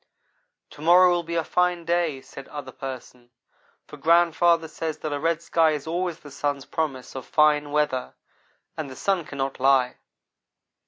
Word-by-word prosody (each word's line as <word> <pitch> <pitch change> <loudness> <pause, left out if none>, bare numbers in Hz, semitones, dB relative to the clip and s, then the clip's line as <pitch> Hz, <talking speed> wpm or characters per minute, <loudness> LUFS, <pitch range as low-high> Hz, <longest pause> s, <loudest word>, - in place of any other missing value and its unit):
"To - - -13
morrow 180 +3 +6
will 175 0 +1
be 170 0 -5
a 165 - +1
fine 180 0 0
day," 170 -5 0
said 135 +1 -11
Other 145 -3 -8
person, 125 -2 -9 0.6
"for - - -12
grandfather 170 0 +3
says 160 0 -4
that 155 -2 -4
a 145 - -2
red 165 +1 0
sky 165 -2 +3
is 150 -2 -4
always 175 +1 -3
the 145 - -12
sun's 140 0 -2
promise 135 -6 -3
of 130 - -6
fine 150 0 +3
weather, 145 -4 -1 0.6
and 155 -3 -5
the 130 - -9
sun 190 +2 0
cannot 135 -2 -4
lie." 130 -1 +3
155 Hz, 165 wpm, -25 LUFS, 135-170 Hz, 0.6 s, morrow